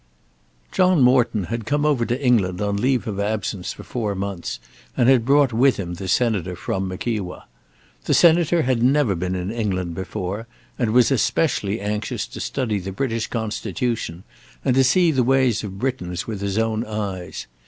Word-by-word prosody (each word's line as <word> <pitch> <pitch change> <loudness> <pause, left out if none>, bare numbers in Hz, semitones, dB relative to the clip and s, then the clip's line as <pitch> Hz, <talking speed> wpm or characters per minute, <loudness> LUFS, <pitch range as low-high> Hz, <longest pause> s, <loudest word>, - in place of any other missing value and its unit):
John 185 -2 +3
Morton 125 -5 +3
had 115 +4 -4
come 145 +1 +1
over 135 -6 +2
to 120 +2 -1
England 105 -9 +2
on 100 -1 -1
leave 125 +3 +1
of 100 -2 -3
absence 100 -2 -2
for - - -10
four 110 -5 -3
months, 95 -2 -4 0.4
and 120 - +3
had 130 -3 +5
brought 140 -2 +4
with 130 +4 +4
him 90 -3 -4
the 95 +2 -6
Senator 95 -3 +1
from 95 +2 -3
Mickewa. 95 0 -4 0.6
The - - +2
Senator 170 -1 +4
had 125 -2 +1
never 130 -3 +3
been 90 +1 -2
in 90 +2 -3
England 95 -7 -2
before 95 +4 -4 0.3
and 120 -3 +1
was 125 +2 +4
especially 120 -5 +1
anxious 105 +1 -3
to - - -10
study 115 -7 -1
the 95 +1 -6
British 115 +2 -2
Constitution 110 -4 -3 0.4
and 130 - +3
to 135 +1 +4
see 165 +6 +4
the 135 -4 +2
ways 130 -3 +2
of 95 -2 -6
Britons 95 -8 -3
with 105 -3 -5
his 100 0 -2
own 115 0 0
eyes. 100 -5 -5
110 Hz, 175 wpm, -22 LUFS, 95-125 Hz, 0.6 s, had